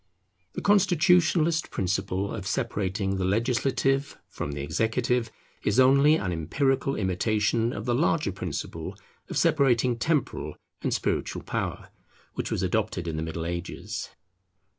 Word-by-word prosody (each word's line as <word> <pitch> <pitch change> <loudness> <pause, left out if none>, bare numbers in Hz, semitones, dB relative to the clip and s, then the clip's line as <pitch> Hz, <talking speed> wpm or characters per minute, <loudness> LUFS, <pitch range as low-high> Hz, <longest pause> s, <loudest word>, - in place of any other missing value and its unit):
The - - -5
constitutionalist 175 -4 +3
principle 95 +1 -1
of 95 - -5
separating 100 -5 -1
the 95 - -1
legislative 130 +6 +1
from 75 - -5
the 70 -1 -4
executive 115 - 0 0.3
is 105 +5 +2
only 140 +4 +6
an 95 - -1
empirical 135 - 0
imitation 110 +4 +1
of 105 - -5
the 120 - +1
larger 150 -2 +1
principle 90 -4 -5 0.3
of - - -3
separating 130 -7 +3
temporal 150 0 -1 0.3
and - - -1
spiritual - - -1
power, - - -3 0.4
which - - -3
was - - -1
adopted 85 - -1
in 80 - -2
the 80 - -2
Middle 80 0 -4
Ages. 85 +1 -5
115 Hz, 130 wpm, -27 LUFS, 95-140 Hz, 0.4 s, only